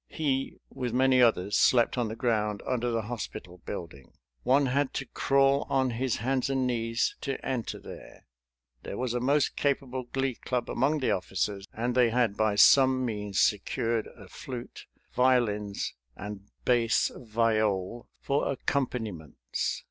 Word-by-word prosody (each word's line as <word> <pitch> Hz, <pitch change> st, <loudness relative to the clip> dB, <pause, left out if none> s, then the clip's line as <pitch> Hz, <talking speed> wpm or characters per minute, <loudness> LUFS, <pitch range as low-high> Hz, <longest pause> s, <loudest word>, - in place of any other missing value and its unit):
He, 135 Hz, -4 st, -1 dB
with 125 Hz, -3 st, -4 dB
many 130 Hz, 0 st, +4 dB
others, 105 Hz, -4 st, +3 dB
slept 120 Hz, -2 st, +4 dB
on 120 Hz, -2 st, 0 dB
the 110 Hz, -, -5 dB
ground 105 Hz, -4 st, -1 dB
under 120 Hz, -1 st, -1 dB
the 115 Hz, -1 st, -1 dB
hospital 100 Hz, -5 st, -7 dB
building. 80 Hz, -9 st, -7 dB, 0.3 s
One 135 Hz, +3 st, +3 dB
had 135 Hz, +1 st, 0 dB
to 135 Hz, -, -2 dB
crawl 135 Hz, +1 st, +2 dB
on 130 Hz, -2 st, +1 dB
his 120 Hz, +1 st, -1 dB
hands 130 Hz, +3 st, -1 dB
and 135 Hz, -1 st, +1 dB
knees 115 Hz, -1 st, 0 dB
to 135 Hz, -, -2 dB
enter 125 Hz, -4 st, -2 dB
there. -, -, -12 dB, 0.6 s
There 100 Hz, -, -6 dB
was 125 Hz, -2 st, -2 dB
a 125 Hz, -, 0 dB
most 140 Hz, +3 st, +1 dB
capable 130 Hz, -3 st, -1 dB
Glee 135 Hz, -1 st, 0 dB
Club 125 Hz, -1 st, -2 dB
among 145 Hz, +4 st, +1 dB
the 130 Hz, -, +1 dB
officers, 95 Hz, +1 st, -2 dB
and 120 Hz, +2 st, -2 dB
they 125 Hz, -2 st, +4 dB
had 115 Hz, -3 st, +1 dB
by 110 Hz, -1 st, +1 dB
some 130 Hz, +3 st, +6 dB
means 105 Hz, -4 st, -2 dB
secured 115 Hz, +2 st, +1 dB
a -, -, -12 dB
flute, 125 Hz, -2 st, -8 dB, 0.3 s
violins, 115 Hz, -6 st, +1 dB, 0.2 s
and 100 Hz, 0 st, -8 dB, 0.2 s
bass 120 Hz, -2 st, +2 dB
viol 110 Hz, -2 st, 0 dB
for 140 Hz, 0 st, 0 dB
accompaniments. 110 Hz, -, -3 dB
120 Hz, 150 wpm, -28 LUFS, 105-130 Hz, 0.6 s, some